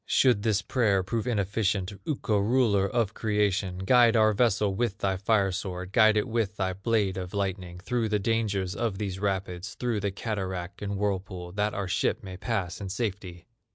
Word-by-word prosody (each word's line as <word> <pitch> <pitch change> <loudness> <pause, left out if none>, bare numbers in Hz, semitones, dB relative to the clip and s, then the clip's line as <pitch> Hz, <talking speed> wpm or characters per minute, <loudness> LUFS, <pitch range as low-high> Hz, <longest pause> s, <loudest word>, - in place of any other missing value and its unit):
"Should 125 -6 +4
this 105 -2 +1
prayer 100 -5 +2
prove 115 +5 -2
inefficient, 100 -3 0
Ukko, 110 -8 0
Ruler 105 -3 +3
of 115 -4 0
creation, 105 -4 0
Guide 120 +4 +4
our 110 -1 +5
vessel 105 -3 +2
with 105 -1 -1
thy 95 -1 0
fire 100 0 +2
sword, 90 0 -5
Guide 110 -1 +5
it 105 - +1
with 110 -3 -1
thy 95 -1 0
blade 100 -1 0
of 90 +1 -5
lightning, 95 -3 -3
Through 115 +3 -1
the 105 - +2
dangers 100 -3 0
of 115 -5 -1
these 95 -2 -3
rapids, 95 -2 -3
Through 120 -4 -1
the 100 0 -1
cataract 95 -3 -4
and 100 -1 -3
whirlpool, 95 -3 -3
That 105 +2 -1
our 100 -1 -2
ship 90 - 0
may 95 -2 -7
pass 95 -1 -3
in 100 - -5
safety!" 95 -4 -4
100 Hz, 180 wpm, -27 LUFS, 95-110 Hz, -, our